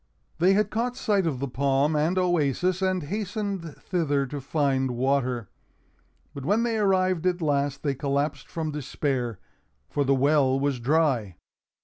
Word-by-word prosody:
They 180 +3 +5
had 210 +1 +1
caught 245 +3 -1
sight 205 -8 +1
of 145 -5 -1
the 140 - -2
palm 140 +3 +1
and 160 +5 +1
oasis 175 +1 +1
and 185 -2 +1
hastened 200 -2 -4
thither 145 -6 0
to 140 +2 -6
find 135 -2 0
water. 130 -3 0 0.9
But 140 - -7
when 205 - +2
they 230 -2 0
arrived 185 -3 +2
at 180 0 +1
last, 145 -3 0
they 140 -2 +1
collapsed 140 +2 -2
from 160 -2 -3
despair, 130 -5 -2 0.5
for 145 - +1
the 135 0 +3
well 135 -1 +3
was 140 -2 0
dry. 125 - +1
150 Hz, 150 wpm, -26 LUFS, 135-185 Hz, 0.9 s, They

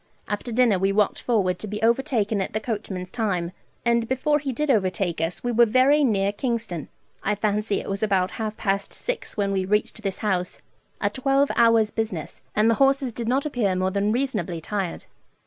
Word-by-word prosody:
After 210 +4 -3
dinner 230 -5 +3
we 195 +1 +2
walked 205 0 +1
forward 190 -7 +1
to 215 - -6
be 210 +1 -4
overtaken 230 -4 +1
at - - -4
the 215 - 0
coachman's 200 -5 -4
time, 190 -7 -1 0.3
and 235 -1 +2
before 295 +4 +1
he 275 -2 -3
did 300 +3 0
overtake 185 -6 0
us 165 +2 -2
we 245 - 0
were 235 0 +5
very 260 +6 +4
near 200 -6 +2
Kingston. 220 - -3 0.3
I 210 - 0
fancy 210 0 0
it - - -8
was 195 0 -2
about 195 -4 +1
half 215 -1 -3
past 200 0 -1
six - - -5
when 200 -1 +1
we 190 -1 0
reached 210 +3 0
this 195 -3 -2
house 180 -3 -1 0.4
a 205 - 0
twelve 275 +4 +2
hours' 230 -2 +4
business, 205 -9 -4
and 215 +1 +4
the 230 - +5
horses 270 -2 +3
did 235 0 -5
not 265 +4 +1
appear 230 -10 0
more 185 +1 0
than 200 +2 +1
reasonably 230 -8 -1
tired. 190 +1 -4
215 Hz, 195 wpm, -24 LUFS, 195-240 Hz, 0.4 s, were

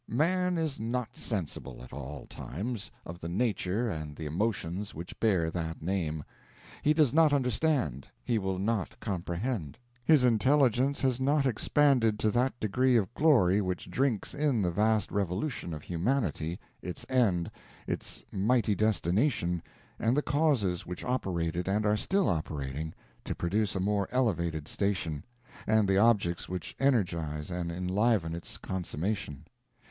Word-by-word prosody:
Man 180 +7 +2
is 160 -4 -1
not 115 +1 -2
sensible, 95 - -4
at 65 - -12
all 70 0 -7
times, 105 - -5 0.2
of 85 +1 -8
the 85 - -5
nature 105 +2 0
and 75 -7 -4
the 80 - -6
emotions 95 +2 -2
which 85 +3 -8
bear 90 -8 +2
that 80 -2 -4
name; 80 -4 -1 0.6
he 150 - +3
does 150 -5 +4
not 160 -1 +6
understand, 125 - +1 0.2
he 115 -3 +1
will 95 -1 -2
not 100 0 -1
comprehend; 90 - -3 0.3
his 150 -1 +5
intelligence 130 +2 +3
has 130 -2 +2
not 140 +1 +3
expanded 125 -2 +3
to 110 0 +1
that 120 +1 +1
degree 125 +5 +2
of 110 +1 0
glory 115 - +4
which 90 -2 -3
drinks 130 -6 0
in 145 -8 +1
the 90 - +1
vast 105 +2 +2
revolution 100 - -2
of 75 -2 -6
humanity, 90 - -1 0.2
its 90 - -6
end, 100 -10 +2 0.3
its - - -5
mighty 110 +2 +2
destination, 100 - +1 0.4
and 115 +5 +2
the 150 - +2
causes 130 - +1
which 90 0 -6
operated, 90 -8 -1
and 105 +2 +1
are 105 0 +3
still 190 - +1
operating, 75 - -2 0.3
to - - -3
produce 100 +5 0
a - - 0
more 100 +1 0
elevated 85 - 0
station, 85 -7 -1 0.4
and 110 -2 +4
the 95 0 +3
objects 100 -6 +2
which 90 -3 -5
energize 85 - 0
and 90 -1 -2
enliven 90 0 +1
its 85 - -6
consummation. 90 -4 -3
100 Hz, 145 wpm, -30 LUFS, 85-125 Hz, 0.6 s, not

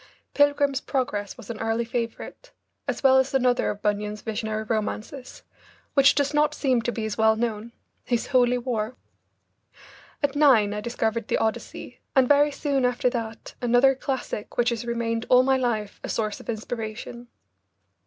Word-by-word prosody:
"Pilgrim's 285 -2 +2
Progress" 210 -7 -2
was 235 -2 -8
an 220 - -7
early 225 +1 -1
favourite, 235 - -5 0.3
as - - -3
well 265 -1 +6
as 265 +1 0
another 250 -2 +2
of 205 +1 -5
Bunyan's 210 0 -1
visionary 220 -1 -3
romances, 220 +4 -4 0.5
which 275 -1 +5
does 285 0 +1
not 300 0 +2
seem 260 -5 +1
to 240 - -1
be 225 -2 -4
as 220 0 -4
well 220 0 +5
known, 225 0 -3 0.3
his 240 -2 -1
"Holy 250 -2 +3
War." 235 -1 -3 1.3
At 285 0 +1
nine 250 -9 +5
I 210 - -4
discovered 230 -1 -2
the - - +1
Odyssey 220 -1 -4 0.2
and 265 -2 +5
very 290 +1 +5
soon 280 -2 -1
after 250 0 +1
that 225 -2 -5
another 245 +2 +4
classic 260 -5 -5
which 240 0 +3
has 235 -1 -3
remained 230 -1 -2
all 250 0 +6
my 265 0 +3
life 220 -5 -2
a - - -5
source 215 -2 -2
of - - -13
inspiration. 230 +1 -5
240 Hz, 165 wpm, -25 LUFS, 220-265 Hz, 1.3 s, well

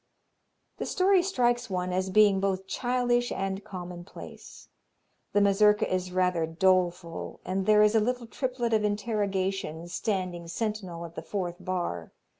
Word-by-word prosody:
The - - -4
story 375 0 +4
strikes 245 - +1
one 180 -1 -2
as 185 +1 0
being 205 -1 +5
both 190 -1 -1
childish 245 +1 0
and 195 +1 -3
commonplace. 180 -2 -9 0.7
The 205 - +4
Mazurka 210 +1 +4
is 185 0 -1
rather 180 -3 +1
doleful 175 0 0
and 190 +1 -2
there 210 0 +6
is 210 0 +4
a 225 - +5
little 245 +2 -1
triplet 245 -1 -2
of 215 -1 +3
interrogation 195 -5 -1
standing 180 -3 -3
sentinel 185 -3 -4
at 165 - -10
the - - -6
fourth 180 -4 -4
bar. 175 - -3
195 Hz, 140 wpm, -28 LUFS, 180-215 Hz, 0.7 s, there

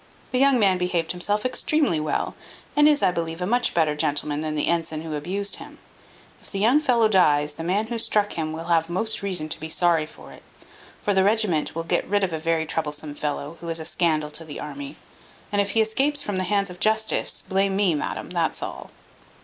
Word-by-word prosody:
The 255 - +1
young 275 -1 +5
man 195 -5 +3
behaved 175 -2 0
himself 205 +5 -1
extremely 265 - +1
well, 150 0 -1 0.4
and 295 0 +6
is, 295 -1 +2
I - - +4
believe, 165 -1 -3
a 180 - -1
much 245 +5 +1
better 155 -3 +2
gentleman 150 0 0
than 155 -1 -3
the 150 - 0
ensign 165 -2 -1
who 160 -1 -5
abused 190 +7 -2
him. - - -11 0.6
If - - -9
the 195 - -4
young 230 +9 +4
fellow 240 -6 +3
dies, 150 -7 +3
the 160 - -7
man 195 +6 +1
who 230 +1 -4
struck 210 -2 +1
him 155 -1 -3
will 160 +1 -5
have 165 -1 +2
most 220 +6 -1
reason 185 -6 0
to - - 0
be 160 - -6
sorry 165 -2 +2
for - - -14
it: - - -14 0.6
for 205 - +1
the 190 -1 +4
regiment 200 -8 +2
will 165 - -2
get 165 - 0
rid 205 0 +1
of 180 -3 0
a 160 - -2
very 165 0 0
troublesome 150 -1 -3
fellow, 150 +2 -4
who 170 - -6
is 165 0 -2
a 160 - -6
scandal 155 -3 0
to 150 +2 -6
the 155 -2 -8
army; 140 0 -7 0.5
and 205 0 +3
if 200 0 -2
he 225 - +4
escapes 270 +7 +1
from 205 -2 -3
the 185 - 0
hands 200 -1 0
of 180 - -11
justice, 220 +1 +1
blame 195 0 +1
me, 195 -4 +3
madam, 150 - -4
that's - - -1
all." - - -7
175 Hz, 220 wpm, -24 LUFS, 155-205 Hz, 0.6 s, and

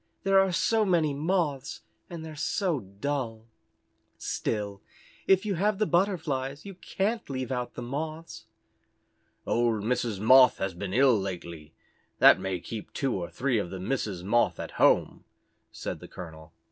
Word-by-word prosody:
There 195 0 +5
are 195 -1 +3
so 215 +6 +2
many 170 -7 +2
Moths, 150 -3 -1 0.3
and 165 -2 -7
they're 155 -1 -8
so 170 +1 0
dull. 115 +2 -4 0.7
Still 100 -2 -3 0.5
if 190 +1 +4
you 205 - 0
have 200 +3 +1
the 215 - +2
Butterflies 155 -7 -1
you 195 - -7
can't 205 +4 -3
leave 130 -2 -4
out 125 -1 -3
the 120 - -5
Moths." 155 0 -6 1.0
"Old 115 -3 +1
Mrs. 115 -3 -1
Moth 130 +4 +7
has 95 -1 -2
been 95 +2 -5
ill 130 -4 +5
lately. 85 -5 -7 0.4
That - - +7
may 95 -2 -3
keep 110 -2 -7
two 135 -3 -1
or 85 -3 -3
three 130 -3 0
of 90 - -3
the 95 - -6
Misses 100 -4 -3
Moth 120 +5 +2
at - - -5
home," - - +3 0.5
said - - -5
the - - -11
colonel. 80 -3 -10
130 Hz, 155 wpm, -28 LUFS, 105-165 Hz, 1.0 s, Moth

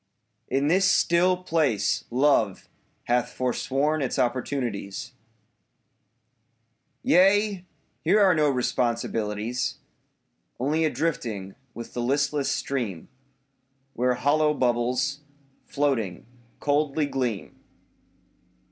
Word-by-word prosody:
In 135 +2 0
this 185 +4 +4
still 180 +2 +3
place 150 - +1
Love 125 -6 +2 0.4
hath 120 0 +1
forsworn 135 +4 0
its 130 - -2
opportunities. 120 -5 -2 1.9
Yea, 195 +1 +4 0.4
here 215 - +4
are 195 -3 +5
no 155 -3 +3
responsibilities. 120 -2 -1 0.8
Only 150 +5 +1
a - - +2
drifting 110 -13 -3 0.2
with 115 - -8
the 120 - -3
listless 140 +3 0
stream 115 -11 -3 0.8
Where 125 +1 +1
hollow 150 +4 +2
bubbles, 125 +3 0 0.5
floating, 125 -11 -1 0.3
coldly 145 +1 +1
gleam. 125 -7 -3
135 Hz, 85 wpm, -25 LUFS, 120-150 Hz, 1.9 s, are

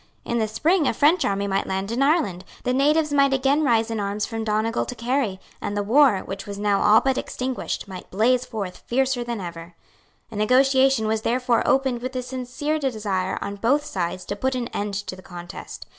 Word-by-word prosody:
In 235 - -1
the 220 - +1
spring 310 - +2
a - - 0
French 310 +9 +4
army 200 0 0
might 195 -1 -1
land 190 +2 -2
in 240 +3 -1
Ireland; 275 - +2 0.2
the 250 - 0
natives 300 +3 +2
might 275 -1 +4
again 275 +3 +2
rise 230 -4 +2
in 225 - -2
arms 205 +1 -1
from 225 -1 -4
Donegal 220 +2 0
to 250 - -5
Kerry; 235 -5 -1 0.2
and 205 - -3
the 205 - 0
war, 240 -1 +4
which 195 +1 -7
was 200 -1 -6
now 205 -1 +1
all 215 +1 +6
but 265 -1 +1
extinguished, 255 -4 -4
might 185 -2 -9
blaze 240 +6 +2
forth 200 -7 -6
fiercer 260 0 +1
than 235 -2 -4
ever. 170 -1 -8 0.6
A - - -8
negotiation 260 +2 +3
was 220 0 0
therefore 245 +1 +1
opened 265 -3 +2
with 255 +1 -5
a 255 - -2
sincere 260 +5 -3
desire 210 -9 -1
on 200 0 -5
both 275 +8 +2
sides 185 - -3
to 200 - -3
put 260 +5 -1
an 245 -1 -3
end 205 -1 -3
to 200 -1 -4
the 185 - -13
contest. 175 -1 -9
230 Hz, 205 wpm, -23 LUFS, 200-265 Hz, 0.6 s, all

